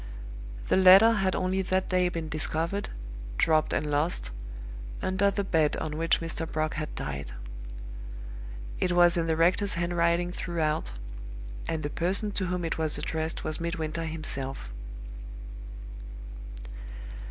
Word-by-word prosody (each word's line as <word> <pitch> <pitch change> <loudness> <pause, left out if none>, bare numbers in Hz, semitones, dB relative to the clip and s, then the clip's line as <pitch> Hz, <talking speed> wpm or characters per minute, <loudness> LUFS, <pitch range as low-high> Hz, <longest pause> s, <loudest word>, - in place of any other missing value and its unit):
The - - +5
letter 190 +4 +9
had 195 -4 +2
only 185 +1 +1
that 190 0 0
day 180 -1 +3
been 165 -2 -3
discovered 160 +5 +1 0.5
dropped 155 -1 +4
and - - +1
lost 145 - 0 0.7
under 190 +2 +2
the 200 0 -1
bed 160 -5 +2
on 155 -1 -3
which 165 +1 +2
Mr. 165 0 -3
Brock 155 0 0
had 155 -1 -4
died. 70 -3 -4 1.5
It 180 - +2
was 175 -1 +6
in 165 -1 +1
the 160 - +2
rector's 185 +5 +3
handwriting 170 0 +2
throughout; 155 - -1 0.7
and 160 -1 -1
the 145 - -1
person 195 +5 +2
to 190 -2 -1
whom 180 -1 -1
it 165 - -1
was 155 -1 +2
addressed 160 0 -2
was 155 - -1
Midwinter 165 -1 -2
himself. 140 - -3
165 Hz, 130 wpm, -29 LUFS, 155-185 Hz, 1.5 s, letter